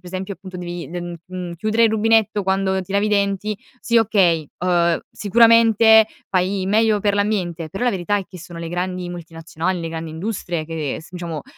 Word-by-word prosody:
esempio 185 +2 -5
appunto 185 -1 -10
devi 175 -4 -6
de 175 +3 -5
mhmm, 175 0 -6
mhmm, 180 -2 -6
chiudere 215 +5 +2
il 220 - +4
rubinetto 220 -1 +2
quando 190 0 0
ti 185 +1 -11
lavi 200 +1 +2
i - - 0
denti, 200 0 0 0.2
sì 235 0 +3
okay, 185 -9 +2 0.2
uhm, 170 -2 +2
sicuramente 225 0 +5 0.2
fai 190 +1 0
meglio 215 +1 +3
per 205 0 +1
l'ambiente, 185 -6 -1
però 195 +9 -4
la 245 - +3
verità 195 +1 -1
è 195 - -3
che 185 - -12
sono 170 0 -10
le 165 -1 -5
grandi 180 0 -3
multinazionali, 165 +1 -4
le 165 - -4
grandi 160 0 -5
industrie 175 -1 -4
che 155 -3 -4
s 160 - -15
diciamo, 170 -4 -5
185 Hz, 190 wpm, -21 LUFS, 175-210 Hz, 0.2 s, sicuramente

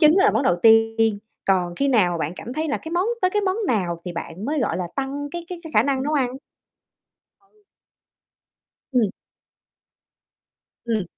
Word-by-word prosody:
trứng 310 +1 +6
đó 390 - +5
là - - +6
món 220 +5 +1
đầu 175 -8 +3
tiên, 225 -1 +4 0.3
còn 180 -3 +1
khi 280 - +1
nào 210 -9 +3
mà 170 - -2
bạn 160 +1 -2
cảm 240 - -7
thấy 310 +3 -2
là 285 - 0
cái 320 - -8
món 360 +4 +1 0.2
tới 370 - +3
cái 415 +1 0
món 380 +1 0
nào 175 -7 -1
thì 180 - -5
bạn 170 +3 -6
mới, 290 +2 -1
gọi 205 - 0
là, 180 - -2
tăng 280 +2 -3
cái 340 +2 -6
cái 360 - -6
cái 320 - -7
khả 215 - +6
năng 265 0 0
nấu 295 - -1
ăn? 260 -3 0 1.0
Ừ. 415 +1 -32 1.3
Ừm. 230 -6 +3 1.7
Ừm. 225 -4 0
250 Hz, 195 wpm, -23 LUFS, 200-310 Hz, 1.7 s, trứng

